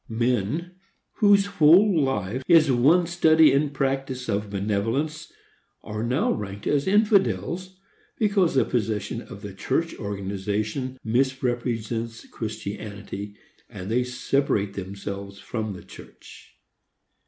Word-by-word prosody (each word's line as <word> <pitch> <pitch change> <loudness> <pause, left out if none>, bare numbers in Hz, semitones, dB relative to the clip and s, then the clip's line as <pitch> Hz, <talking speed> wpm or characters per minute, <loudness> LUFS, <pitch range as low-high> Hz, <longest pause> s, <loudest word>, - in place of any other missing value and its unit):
Men, 125 - -1 0.4
whose 205 -2 +5
whole 180 -1 +5
life 115 -2 -1
is 160 -4 +6
one 145 +9 +4
study 160 -3 +5
and 140 +1 +2
practice 135 -2 -2
of 105 -1 -1
benevolence, 110 +10 -2 0.5
are 105 0 -5
now 125 +6 +1
ranked 100 -1 -5
as 145 +1 +1
infidels, 185 - +1 0.4
because 200 -7 +2
the 130 - +4
position 110 -1 -2
of 105 -5 -11
church 165 0 0
organizations 105 +5 -3
misrepresents 120 -2 -1
Christianity, 105 -2 -6 0.3
and 95 +3 -7
they 125 +2 +2
separate 125 -5 0
themselves 100 +1 -6
from 110 0 -4
the 90 - -10
church. - - -14
120 Hz, 110 wpm, -25 LUFS, 105-150 Hz, 0.5 s, is